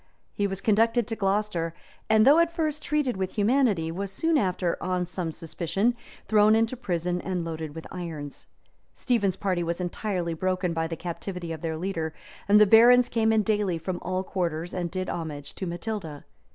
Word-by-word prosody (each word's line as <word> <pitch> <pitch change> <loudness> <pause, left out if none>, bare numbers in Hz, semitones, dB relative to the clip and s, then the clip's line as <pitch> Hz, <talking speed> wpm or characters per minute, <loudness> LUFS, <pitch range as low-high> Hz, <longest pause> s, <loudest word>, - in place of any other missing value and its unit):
He 205 - 0
was 195 0 -4
conducted 225 +2 +3
to 225 - -3
Glocester; 195 -5 0 0.4
and 220 0 +5
though 290 +5 +7
at 335 0 +3
first 310 -3 -2
treated 295 -9 0
with 190 -1 -2
humanity, 210 -7 +2
was 195 +3 -4
soon 325 +10 +1
after, 185 - +1
on 180 -1 -1
some 175 -2 -4
suspicion, 175 +8 -1 0.3
thrown 215 0 +5
into 225 +3 +1
prison, 180 -6 -2
and 180 -3 -3
loaded 160 -2 -5
with 160 - -7
irons. 160 -6 -7 0.5
Stephen's 205 -7 +1
party 185 -3 -1
was 170 +1 -2
entirely 180 -1 -2
broken 185 +1 -1
by 165 0 -1
the 165 - -4
captivity 175 +1 -5
of 160 -2 -6
their 160 -1 -3
leader, 165 -3 -3 0.3
and 205 +1 +6
the 210 - +8
barons 240 +4 +7
came 225 -1 +2
in 220 -1 +3
daily 205 -5 0
from 175 +2 -4
all 185 +1 -2
quarters, 175 -3 -3
and 175 -2 -2
did 185 +1 -3
homage 150 -4 -5
to 190 - -5
Matilda. 175 -4 -5
185 Hz, 180 wpm, -26 LUFS, 170-220 Hz, 0.5 s, the